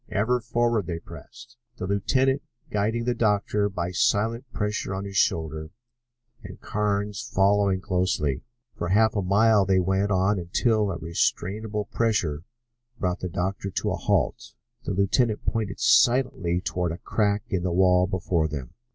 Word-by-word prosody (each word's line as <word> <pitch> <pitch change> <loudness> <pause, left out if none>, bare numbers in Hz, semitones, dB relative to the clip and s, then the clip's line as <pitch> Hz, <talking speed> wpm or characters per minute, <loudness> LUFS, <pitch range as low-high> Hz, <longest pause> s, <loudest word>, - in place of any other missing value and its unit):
Ever 120 +5 +1
forward 120 -3 0
they 85 -2 -3
pressed, 115 +9 -13 0.2
the - - -4
lieutenant 130 +8 +1 0.3
guiding 110 +3 0
the 125 - +1
doctor 105 -2 +1
by 90 -2 -3
silent 115 +7 0
pressure 105 -3 -2
on 95 +1 -4
his 100 0 -7
shoulder 80 -3 0 0.7
and 95 -4 -10
Carnes 105 -1 -2
following 100 -1 +2
closely. 90 -8 0 0.3
For 85 - -3
half 110 +4 +3
a 100 - +1
mile 105 +3 +4
they 95 0 +2
went 95 +2 +1
on 95 +1 +2
until 105 +4 +1
a 90 - -3
restrainable 105 +5 -2
pressure 90 -10 0 0.6
brought 90 -1 -1
the 90 - -4
doctor 95 +2 -3
to - - -2
a - - 0
halt. - - -1 0.3
The - - -2
lieutenant 105 +4 +1
pointed 105 -4 -2
silently 120 -9 +3
toward 90 -2 -2
a 85 - -5
crack 105 +1 0
in 95 - -1
the 90 0 -1
wall 90 0 +4
before 90 -4 0
them. 70 -5 -6
100 Hz, 150 wpm, -25 LUFS, 90-110 Hz, 0.7 s, mile